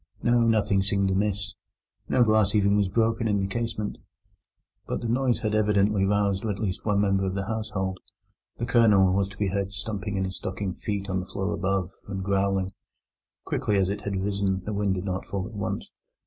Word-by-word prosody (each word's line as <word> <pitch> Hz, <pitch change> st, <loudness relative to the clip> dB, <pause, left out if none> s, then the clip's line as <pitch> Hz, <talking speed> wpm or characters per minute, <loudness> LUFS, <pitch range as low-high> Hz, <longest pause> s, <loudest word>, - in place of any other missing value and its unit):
No, 120 Hz, 0 st, +4 dB
nothing 105 Hz, -3 st, +3 dB
seemed 100 Hz, 0 st, +1 dB
amiss; 100 Hz, 0 st, -1 dB, 0.6 s
no 125 Hz, -, +4 dB
glass 110 Hz, -2 st, +3 dB
even 100 Hz, -1 st, +4 dB
was 100 Hz, -2 st, +2 dB
broken 115 Hz, +3 st, +1 dB
in 105 Hz, -2 st, +2 dB
the 95 Hz, -, 0 dB
casement. 110 Hz, 0 st, -3 dB, 0.9 s
But -, -, -2 dB
the 120 Hz, -, -3 dB
noise 125 Hz, +1 st, +1 dB
had 110 Hz, -3 st, -1 dB
evidently 105 Hz, -2 st, +3 dB
roused 100 Hz, -1 st, +1 dB
at 105 Hz, -3 st, -1 dB
least 100 Hz, -3 st, -3 dB
one 105 Hz, -2 st, +2 dB
member 95 Hz, -1 st, +2 dB
of 95 Hz, -, -2 dB
the 100 Hz, -1 st, -2 dB
household: 105 Hz, -4 st, -3 dB, 0.6 s
the 120 Hz, -, -2 dB
Colonel 105 Hz, -6 st, +5 dB
was 100 Hz, 0 st, +2 dB
to 100 Hz, -, -13 dB
be 100 Hz, -2 st, 0 dB
heard 100 Hz, 0 st, -1 dB
stumping 105 Hz, 0 st, -4 dB
in 95 Hz, -, 0 dB
his 95 Hz, 0 st, -5 dB
stockinged 95 Hz, 0 st, -4 dB
feet 100 Hz, -2 st, -2 dB
on 95 Hz, -1 st, 0 dB
the 90 Hz, -, -6 dB
floor 95 Hz, +2 st, -2 dB
above, 95 Hz, -1 st, -1 dB, 0.2 s
and 95 Hz, -1 st, -4 dB
growling. 95 Hz, -1 st, +1 dB, 0.7 s
Quickly 105 Hz, -, 0 dB
as 95 Hz, -1 st, +2 dB
it 100 Hz, -, -3 dB
had 100 Hz, -1 st, -3 dB
risen, 100 Hz, -1 st, -1 dB
the 105 Hz, -, -3 dB
wind 100 Hz, -1 st, +1 dB
did 90 Hz, +1 st, -4 dB
not 95 Hz, -1 st, -3 dB
fall 95 Hz, -2 st, -3 dB
at -, -, -9 dB
once. 100 Hz, -1 st, -4 dB
100 Hz, 200 wpm, -26 LUFS, 95-105 Hz, 0.9 s, Colonel